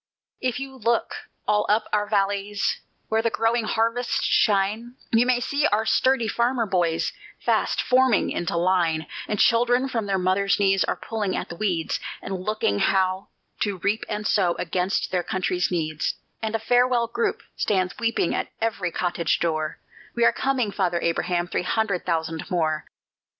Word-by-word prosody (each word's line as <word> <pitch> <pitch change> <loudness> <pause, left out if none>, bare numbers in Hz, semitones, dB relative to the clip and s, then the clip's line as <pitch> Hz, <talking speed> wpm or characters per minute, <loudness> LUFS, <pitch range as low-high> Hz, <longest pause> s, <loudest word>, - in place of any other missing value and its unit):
If 250 -1 -1
you 270 0 -7
look 235 0 0 0.3
all 210 0 +2
up 215 +1 +3
our 210 -1 +1
valleys 200 0 0 0.3
where 220 0 +2
the 230 - +1
growing 225 0 +1
harvests 230 +3 0
shine, 215 +4 +1 0.2
You 230 +2 +4
may 250 -1 +3
see 280 +4 +1
our 215 +2 +1
sturdy 260 0 +2
farmer 235 +2 +1
boys 175 -5 0 0.3
fast - - +1
forming 255 -3 +3
into 170 0 -2
line; 170 -3 +1 0.2
And 210 - -1
children 245 +2 +3
from 225 -5 -2
their 195 -1 +1
mother's 190 +2 +1
knees 195 -1 +3
are - - -1
pulling 210 -4 -3
at - - -4
the 170 - -6
weeds, 175 -4 -1 0.2
And 190 -1 -5
learning 185 - 0
how 190 0 +1 0.3
to 205 -3 -1
reap 205 +5 0
and 210 0 -3
sow 180 -5 +2
against 180 +2 -1
their 180 - +1
country's 180 0 -1
needs; 155 -3 -1 0.3
And 220 0 -2
a - - 0
farewell 245 +1 +3
group 235 0 -2
stands 185 -3 0
weeping 230 -6 +1
at - - -1
every 225 -5 -1
cottage 175 0 0
door: 155 -2 -1 0.4
We 235 -1 +3
are - - +5
coming, 260 -6 0
Father 180 -4 0
Abraham, 175 +1 0
three - - -1
hundred 200 -1 -1
thousand 165 0 -2
more! 160 -4 0
205 Hz, 165 wpm, -24 LUFS, 180-230 Hz, 0.4 s, are